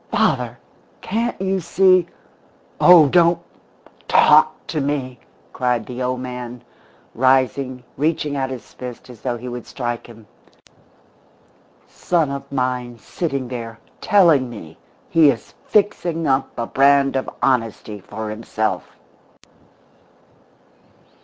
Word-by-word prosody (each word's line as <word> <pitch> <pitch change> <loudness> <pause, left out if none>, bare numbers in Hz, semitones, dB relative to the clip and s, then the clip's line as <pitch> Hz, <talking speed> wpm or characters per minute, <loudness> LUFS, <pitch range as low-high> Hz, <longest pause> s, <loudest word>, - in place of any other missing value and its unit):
"Father! - - +1 0.4
Can't 235 +3 -2
you 190 0 0
see 185 0 +3 0.4
" - - -23
"Oh, 175 -4 +8
don't 170 +2 +4 0.7
talk - - +4
to 155 - -3
me!" 135 -3 -3 0.3
cried 125 -3 0
the 125 +2 -7
old 125 0 -2
man, 125 -1 -7 0.5
rising, 130 0 +1
reaching 150 -1 -1
out 135 -1 -1
his 130 -3 -9
fist 125 0 -9
as 115 - -15
though 125 -2 -2
he 125 +2 -9
would 120 -1 -7
strike 120 -2 -4
him. 115 -2 -14 1.6
"Son 165 -5 -1
of 140 0 -7
mine 125 -2 -2
sitting 140 +1 -4
there 115 -3 -6 0.2
telling 170 - +4
me 80 -9 -10 0.3
he 160 -3 +5
is 120 -5 -3
fixing 175 -6 +1
up 135 -1 +1
a 115 - -2
brand 140 +2 +3
of 130 - -1
honesty 115 -4 -1
for 105 +3 -7
himself!" 110 -3 -3
130 Hz, 120 wpm, -20 LUFS, 120-150 Hz, 1.6 s, Oh